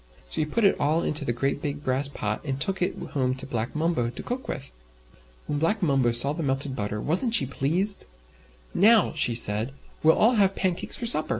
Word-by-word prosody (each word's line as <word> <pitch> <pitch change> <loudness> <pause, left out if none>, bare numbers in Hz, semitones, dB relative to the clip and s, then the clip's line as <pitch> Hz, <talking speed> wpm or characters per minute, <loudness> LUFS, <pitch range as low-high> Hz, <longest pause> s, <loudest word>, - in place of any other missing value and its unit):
So - - 0
he 155 - -1
put 230 +9 -1
it 200 - +5
all 155 +3 +1
into 150 0 -1
the 120 - -1
great 135 +4 -2
big 145 0 -4
brass 130 +1 +1
pot, 110 -6 -3
and 135 -2 -3
took 190 +5 -1
it 180 - 0
home 130 -2 0
to 135 - -4
Black 120 -1 -4
Mumbo 155 -7 0
to 120 - -7
cook 255 +2 -5
with. 135 - -4 0.7
When 145 - -2
Black 190 +6 0
Mumbo 135 -6 +2
saw 120 +5 +2
the 165 - -5
melted 135 -1 -1
butter, 105 -1 -3
wasn't 190 - +1
she 140 - +4
pleased! 170 +10 -2 0.7
"Now," 220 +3 +5
said 120 -7 +3
she, 110 +2 0 0.3
"we'll 160 +1 +4
all 230 +2 +4
have 195 0 +2
pancakes 185 -3 -1
for 240 - -4
supper!" 190 -10 +4
145 Hz, 210 wpm, -25 LUFS, 130-180 Hz, 0.7 s, it